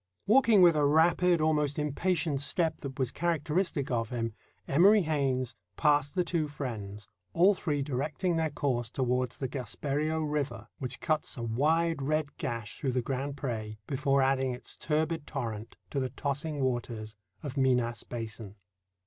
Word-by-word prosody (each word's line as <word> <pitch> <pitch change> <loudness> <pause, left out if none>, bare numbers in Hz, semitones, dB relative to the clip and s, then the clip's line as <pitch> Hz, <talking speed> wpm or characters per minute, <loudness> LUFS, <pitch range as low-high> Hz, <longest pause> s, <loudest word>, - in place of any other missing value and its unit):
Walking 220 -3 +6
with 170 -2 +7
a 150 - +2
rapid, 165 +3 +4
almost 150 -2 +1
impatient 150 0 0
step 160 +2 0
that 135 -2 -7
was 130 -2 +1
characteristic 165 -2 0
of 115 -2 0
him, 115 -2 -2 0.3
Emory 195 +8 +6
Haynes 135 -5 0 0.2
passed 145 -1 +2
the 180 - +3
two 170 -3 -1
friends, 105 -8 -6 0.3
all 185 - +5
three 150 -7 -1
directing 150 +6 -1
their 160 -1 +1
course 130 -5 -1
toward 125 0 0
the 135 - -3
Gaspereaux 145 +4 -2
River, 150 -2 -2
which 130 -1 -5
cuts 155 -1 -1
a 120 - -4
wide 155 +7 +1
red 150 +1 -1
gash 115 -3 -4
through 135 -4 -1
the 125 -1 0
Grand 135 +2 -3
Pré 110 -6 -4
before 140 0 +2
adding 130 -1 +1
its - - -7
turbid 160 0 -1
torrent 115 -6 -5
to 140 - -1
the 130 -1 -1
tossing 145 +3 -3
waters 120 -4 -2 0.3
of 145 -3 -5
Minas 125 -4 +2
Basin. 110 -3 -6
140 Hz, 155 wpm, -30 LUFS, 125-155 Hz, 0.3 s, with